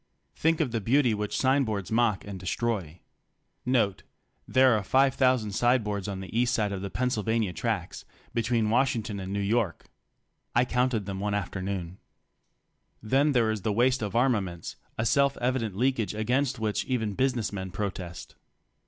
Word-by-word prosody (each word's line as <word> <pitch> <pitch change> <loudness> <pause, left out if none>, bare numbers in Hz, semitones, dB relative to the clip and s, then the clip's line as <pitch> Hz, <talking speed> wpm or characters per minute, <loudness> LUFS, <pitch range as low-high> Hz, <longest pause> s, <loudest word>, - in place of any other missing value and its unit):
Think 160 0 +2
of 140 -6 0
the 115 -1 -1
beauty 125 +2 +3
which 105 -1 -2
sign 135 +1 +3
boards 105 -5 -3
mock 110 -3 +2
and 100 -2 -7
destroy. 95 -4 -2 0.7
(There 125 +2 +1
are 105 - 0
5,000 130 -1 +2
sign 120 +3 +2
boards 100 -2 -3
on 95 -2 -4
the 95 +3 -8
east 120 +1 +2
side 105 -3 0
of 95 -2 -4
the 100 - -4
Pennsylvania 110 -4 0
tracks - - -3 0.3
between 115 -2 +1
Washington 115 -5 +1
and 95 0 -5
New 100 - -1
York. 100 -3 0 0.7
I 120 +1 +4
counted 125 -4 0
them 95 -1 -4
one 105 +1 -1
afternoon.) 95 -2 -4 1.0
Then 140 +6 +3
there 115 -3 +3
is 110 -2 -3
the 110 - 0
waste 125 +4 +2
of 105 -1 -3
armaments, 105 -9 0 0.2
a 110 - 0
self 140 +3 +3
evident 120 -5 -1
leak 130 +2 +2
age 105 -1 -2
against 125 +5 0
which 110 -2 -1
even 110 -5 -1
business 125 -2 0
men 95 -1 -4
protest. 90 -2 -5
110 Hz, 160 wpm, -28 LUFS, 100-125 Hz, 1.0 s, I